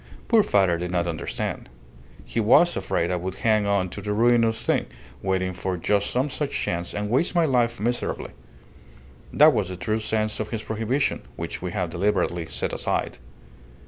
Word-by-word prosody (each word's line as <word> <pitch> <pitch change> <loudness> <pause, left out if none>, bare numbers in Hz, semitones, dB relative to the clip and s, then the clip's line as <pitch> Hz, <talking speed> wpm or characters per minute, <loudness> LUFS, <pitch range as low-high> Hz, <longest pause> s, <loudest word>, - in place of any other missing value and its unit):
Poor 230 -2 +5
father 95 - +2
did 90 0 -3
not 85 -1 0
understand. 80 -6 -4 0.6
He - - -3
was 125 +11 +5
afraid 85 - -1
I 90 - 0
would 90 +1 -4
hang 110 -2 +2
on 100 -2 +1
to 100 - -7
the 105 +1 -2
ruinous 115 0 +3
thing, - - +1 0.3
waiting 95 -1 0
for 90 0 -3
just 100 +4 +1
some 130 +3 +1
such 140 +2 -2
chance, 85 0 -3
and 105 0 -2
waste 135 - +1
my 170 -1 +4
life 120 -5 +1
miserably. 120 +3 -2 1.0
That 150 +1 +6
was 100 -4 0
the 90 - -6
true 110 +5 -1
sense 110 0 -1
of 110 -1 -3
his 110 -2 -4
prohibition, 115 +6 -1
which - - -5
we 90 - -3
have 90 -4 -2
deliberately 90 -2 0
set 65 -4 -3
aside." - - -2
105 Hz, 175 wpm, -24 LUFS, 90-115 Hz, 1.0 s, That